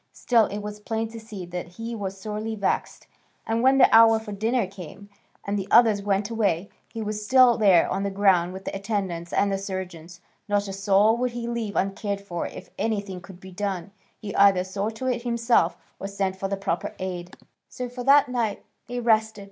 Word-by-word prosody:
Still 230 -3 +3
it 205 +1 -5
was 210 0 -6
plain 225 +1 -3
to 225 0 -9
see 215 -4 -8
that 175 0 -7
he 230 +1 -5
was 195 -3 -5
sorely 215 +2 -4
vexed, 200 -2 -2 0.4
and 225 +1 0
when 265 +2 +5
the 255 - +7
hour 225 0 +7
for 220 -1 -7
dinner 225 +3 0
came, 195 +1 -11 0.4
and 200 0 -1
the 195 - -5
others 220 -4 +5
went 200 +1 -1
away, 200 -5 0 0.2
he 225 - -5
was 210 0 -4
still 255 +1 +6
there 195 -6 +5
on 195 - -2
the 200 - -1
ground 190 -3 +3
with 190 +1 -9
the - - -4
attendants 195 -4 -3
and 200 0 +2
the 195 - -1
surgeons; 180 -3 -6 0.3
not 205 0 +1
a 195 - -5
soul 200 +3 +3
would 250 0 -1
he 235 -1 -4
leave 235 -3 -3
uncared 200 +1 -1
for 180 -4 -4
if - - -11
anything 200 -4 -2
could 190 -1 -13
be 190 0 -12
done: 195 -1 -4 0.3
he 205 -2 -7
either 195 -2 +5
saw 195 +3 -3
to 225 +3 -7
it 250 -2 0
himself 235 0 +1 0.2
or 195 - -4
sent 195 -1 -2
for 195 +1 -3
the 200 0 -2
proper 195 -3 -3
aid. 180 -1 -6 0.3
So 250 - -5
for 245 0 -7
that 280 +2 +6
night 235 -4 -2 0.2
they 245 0 -4
rested. 220 -2 +2
205 Hz, 205 wpm, -25 LUFS, 195-225 Hz, 0.4 s, the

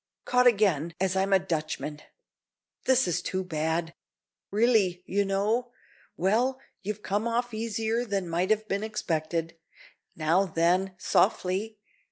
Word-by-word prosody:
caught 250 0 +4
again, 180 -8 +2
as 190 0 +1
I'm 190 +1 +1
a 195 - +7
Dutchman. 155 -4 -3 0.8
This 260 -3 +4
is 180 +1 0
too 185 +1 -2
bad. 160 0 -2 0.6
Really, 205 -5 +2
you 200 +1 +1
know 210 +5 0 0.5
well, 240 +8 +1 0.2
you've 210 +1 -5
come 205 +4 -1
off 240 0 -1
easier 225 +1 -1
than 200 -5 -2
might 175 +3 0
have 215 0 +1
been 200 -1 -1
expected. 165 -5 -2 0.6
Now 165 +5 +2
then, 180 +3 +1
softly. 190 +3 +1
195 Hz, 130 wpm, -28 LUFS, 170-220 Hz, 0.8 s, a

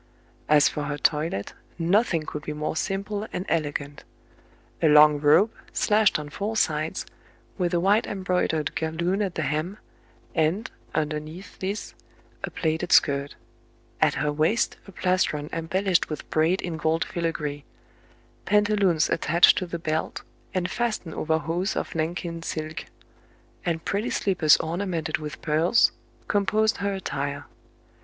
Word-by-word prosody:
As 150 -1 +6
for 150 - -3
her 145 0 -3
toilet, 150 -10 0 0.2
nothing 175 0 +2
could 150 0 -6
be 150 - -5
more 150 +1 -3
simple 200 +4 -2
and 180 - -4
elegant. 145 -3 -2 0.8
A 160 - +4
long 150 0 +7
robe, 155 +9 +5 0.2
slashed 215 -2 +3
on 150 -1 -7
four 215 +6 -3
sides, 155 -4 0 0.5
with 175 -2 +1
a - - +3
wide 200 +5 +3
embroidered 180 -5 -1
galloon 170 +5 -1
at 195 -4 -2
the 160 - -1
hem, 155 +7 -2 0.6
and, 165 +6 0 0.2
underneath 155 +4 -4
this, 195 +3 -4 0.5
a - - -2
plaited 160 +1 -2
skirt; 140 -1 +3 0.7
at - - +4
her 150 - 0
waist 160 +9 +1
a - - -10
plastron 180 -5 0
embellished 180 +3 +1
with 155 - -6
braid 160 +4 +2
in 170 -2 -3
gold 160 +1 +1
filagree; 150 -4 -3 0.8
pantaloons 205 -5 +3
attached 170 +1 +4
to 185 - -4
the 170 - -4
belt, 160 -1 -3 0.3
and 185 0 -2
fastened 220 -9 -2
over 160 0 0
hose 165 +6 -2
of - - -3
Nankin 165 +1 -3
silk; 155 -1 -5 0.8
and 165 -2 -2
pretty 210 +5 -1
slippers 175 -6 +3
orna 175 +5 -3
mented 160 -3 -2
with 150 -1 -7
pearls, 165 +8 +3 0.4
composed 215 +2 +2
her 200 0 -1
attire. 140 -6 -4
165 Hz, 140 wpm, -25 LUFS, 155-190 Hz, 0.8 s, long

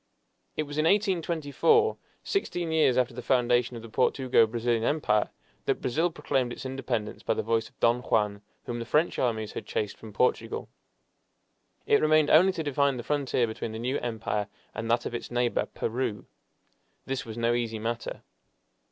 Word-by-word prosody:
It 155 - +1
was 145 0 -5
in 155 - +2
1824, 190 - +2 0.3
sixteen 175 - -1
years 155 -6 +3
after 125 -1 +2
the 125 - -6
foundation 125 -1 +2
of 115 - -8
the - - -8
Portugo 125 0 +3
Brazilian 115 0 0
Empire, 115 -7 +1 0.4
that - - +1
Brazil 160 +8 +1
proclaimed 135 -6 -1
its 120 - -7
independence 130 -5 -3
by - - 0
the - - -1
voice 115 0 0
of - - -36
Don 120 +1 +3
Juan, 105 -3 0 0.2
whom 120 -1 -4
the 115 - -4
French 150 +8 +1
armies 110 -4 0
had - - -7
chased 105 -2 -2
from 110 - -11
Portugal. 115 +1 0 1.2
It - - +4
remained 155 -1 +4
only 185 +5 +7
to 165 - -3
define 140 -2 +1
the 120 - -5
frontier 135 -3 +1
between 110 0 -5
the - - -4
new 125 +4 -1
empire 110 -3 -2 0.3
and 115 +2 -4
that 120 - +2
of - - -4
its 120 - -5
neighbor, 120 -1 0
Peru. 115 -2 -3 0.8
This 135 0 -2
was 115 0 -8
no 115 0 +2
easy 115 -2 -1
matter. 115 +2 -4
120 Hz, 175 wpm, -28 LUFS, 115-145 Hz, 1.2 s, only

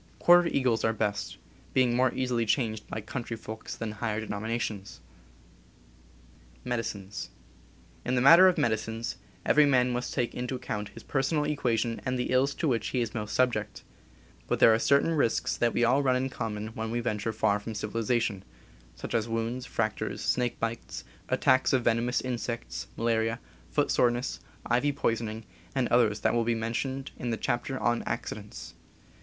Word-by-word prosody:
Quarter 175 0 +6
eagles 125 -7 +1
are 110 - +2
best, 105 -1 -2 0.4
being 125 -2 +3
more 130 +1 +3
easily 125 -2 0
changed 110 -2 -1
by 110 - -4
country 115 +1 -5
folks 110 0 -7
than 115 -1 -4
higher 110 0 -2
denominations. 110 -1 -4 1.7
In 125 - 0 1.4
the - - +3
matter 165 +9 +9
of 185 - +3
medicines, 115 0 -1 0.3
every 150 -1 +5
man 125 -2 +3
must 125 0 -2
take 120 -3 -1
into 125 +1 -3
account 110 -5 -4
his 115 - -12
personal 145 +2 0
equation 120 -6 0
and 130 0 -1
the 125 - -2
ills 135 +2 +2
to 165 - -1
which 115 -5 0
__ - - -9
J.. - - 0
he - - +2
is 110 - -6
most 105 -2 -3
subiect; 105 -6 0 0.6
but - - +1
there 115 - +7
are 110 - +2
cer 140 +4 +4
JxLCQlClIlCS - - -4
tain - - 0
risks 145 -8 +1
that 120 -1 +1
we 120 - +2
all 130 +4 +4
run 130 -2 +2
in 130 +1 0
common 110 -3 -4
when 110 0 -5
we 120 +1 -1
venture 115 -2 -1
far 105 -1 +1
from 110 +1 -7
civilization, 110 -1 -1 0.5
such - - -7
as 115 0 0
wounds, 115 +2 -2
fractures, - - -2
snake 125 -1 0
bites, 115 0 -4 0.3
attacks 130 +1 +3
of 130 -2 +3
venomous 120 +2 +1
insects, 120 -2 -4
malaria, 115 0 +1 0.3
footsoreness, 120 +1 +1 0.3
ivy 125 +4 +2
poisoning, 115 -4 -2 0.3
and 130 -2 +1
others 110 -3 +3
that - - +2
will 120 -1 +2
be 115 0 +1
mentioned 130 +4 -3
in 125 - -3
the 115 - -1
chapter 130 +2 -2
on 120 0 +1
Accidents. - - -5
120 Hz, 170 wpm, -28 LUFS, 110-130 Hz, 1.7 s, matter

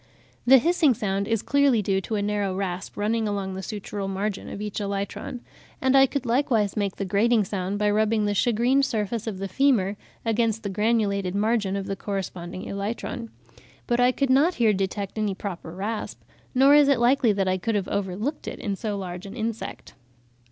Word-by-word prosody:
The 265 +2 +9
hissing 320 -1 +3
sound 200 -3 -1
is 225 -2 0
clearly 280 -6 +3
due 195 0 +1
to 220 - -3
a 205 - 0
narrow 205 -2 -1
rasp 190 -1 -4
running 220 +2 0
along 200 -2 -2
the 190 - -5
sutural 205 -1 -5
margin 195 +1 -3
of - - -6
each 210 0 -4
elytron; 200 +4 -4 0.4
and 260 0 +2
I 270 0 +7
could 275 -1 -3
likewise 235 -4 +1
make 200 -3 -1
the 195 - -3
grating 215 +4 +3
sound 195 0 -3
by 210 0 +2
rubbing 215 0 +2
the 205 - +1
shagreened 240 +6 +2
surface 220 -2 -2
of 210 -4 -3
the 195 +1 -4
femur 210 -6 +2 0.3
against 225 -1 +1
the 200 - -2
granulated 200 -2 0
margin 210 -2 +1
of 195 -1 -3
the 195 - -3
corresponding 185 -3 -5
elytron; 225 +4 -4 0.6
but 240 -1 0
I 245 +1 +5
could 275 0 0
not 300 +7 +4
here 225 -3 +3
detect 195 +2 -3
any 205 -3 0
proper 185 -4 -6
rasp; 205 +6 -4 0.4
nor 270 +2 +6
is 295 -1 +7
it 280 -2 +4
likely 240 0 +4
that 195 -1 0
I 185 0 +1
could 225 +4 -1
have 200 -2 -1
overlooked 200 - -3
it - - -5
in 200 -2 -3
so 210 0 -3
large 180 0 -6
an 200 - -9
insect. 225 -1 -5
210 Hz, 195 wpm, -25 LUFS, 195-235 Hz, 0.6 s, The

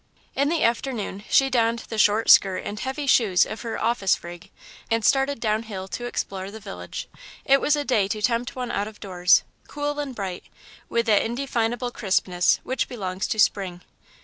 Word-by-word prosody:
In 280 +1 +1
the 330 0 +1
afternoon 230 -4 -1
she 270 0 +4
donned 230 -2 +1
the 220 - -3
short 210 +2 +3
skirt 190 -2 +5
and 210 - -5
heavy 265 +4 -3
shoes 215 -9 +4
of 215 - -7
her 230 -2 -4
"office 220 -5 +1
rig," 175 0 -10 0.4
and 225 -1 0
started 275 -1 +2
down 215 -1 0
hill 195 -4 -7
to 240 - -5
explore 195 -5 -4
the 220 +2 -9
village. 200 -2 -7 0.4
It 275 0 +4
was 300 - +3
a 290 -1 -2
day 220 -8 +2
to 215 +2 -3
tempt 240 +1 0
one 250 -1 -4
out 205 - -1
of 215 -1 -11
doors, 180 -2 +3 0.2
cool 290 0 -3
and 280 -3 -4
bright, 190 -4 -5 0.4
with 235 0 +1
that 215 -3 +4
indefinable 240 -1 -2
crispness 185 -5 +1
which 260 - -2
belongs 190 -5 -3
to 225 - -2
Spring. 195 -4 +1
225 Hz, 185 wpm, -24 LUFS, 195-250 Hz, 0.4 s, skirt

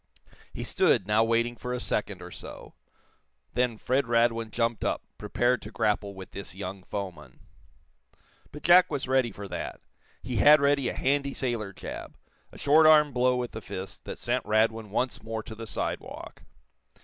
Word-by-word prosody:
He - - -6
stood, 95 - +2
now 105 +2 +3
waiting 115 +1 +1
for 125 +1 -5
a - - -3
second 100 -5 -2
or 90 - -9
so. - - -10 0.8
Then 125 -2 +1
Fred 130 +3 0
Radwin 115 -1 +2
jumped 115 0 -1
up, - - -1 0.2
prepared 125 -1 +1
to 105 - -9
grapple 105 -3 0
with 95 -1 -10
this 100 -2 -8
young 95 0 -6
foeman. 90 -9 -7 1.1
But 150 - -10
Jack 180 +1 +7
was 140 -4 -3
ready 130 -3 +2
for 100 0 -8
that. 90 - -5 0.4
He 125 -2 -3
had 150 +1 +8
ready 140 -2 +2
a - - -4
handy 140 +1 0
sailor 120 -6 -2
jab - - -8 0.3
a - - -13
short 155 +2 +5
arm 150 -2 +6
blow 125 +1 +3
with 125 -1 -3
the 110 - -7
fist 95 -1 -7
that - - -6
sent 125 +1 -1
Radwin 110 0 +1
once 125 +5 -1
more 110 0 -5
to 110 - -9
the 115 +1 -8
sidewalk. - - -5
115 Hz, 175 wpm, -28 LUFS, 105-130 Hz, 1.1 s, had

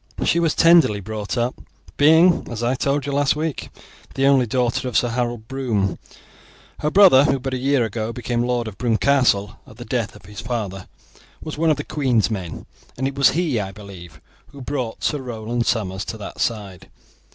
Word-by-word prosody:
She 170 - +2
was 165 -2 +1
tenderly 165 -11 +5
brought 105 +2 -5
up, 120 +1 -2 0.3
being, 160 +4 +4
as 120 -1 -5
I 120 +2 +1
told 140 +1 -1
you 140 - -3
last 140 0 +2
week, 155 -1 -4 0.5
the 135 - +1
only 135 -3 +4
daughter 125 +2 0
of 120 -4 0
Sir 120 - +2
Harold 120 -2 -3
Broome. 115 -9 -1 0.8
Her 150 - 0
brother, 165 -7 +7
who 135 - +2
but 130 0 -5
a - - -1
year 135 -2 +2
ago 110 +1 -4
became 120 0 -2
lord 120 -1 -1
of 105 - -9
Broomecastle 120 -3 +1
at - - -15
the - - -9
death - - -2
of - - -16
his 105 +2 -9
father, 105 -5 -4 0.5
was 155 - -7
one 165 0 +2
of 155 - +2
the 145 - -4
queen's 125 - 0
men, 90 -6 -5 0.3
and 130 +2 -1
it 135 - -4
was 140 0 +4
he, 160 -10 0
I 95 -2 -4
believe, 95 -6 -12 0.3
who 140 - -14
brought 125 -3 -4
Sir 150 - 0
Roland 120 -1 -3
Somers 100 -4 -1
to 110 - -6
that 105 - -9
side. 100 -6 -3
120 Hz, 195 wpm, -21 LUFS, 110-140 Hz, 0.8 s, brother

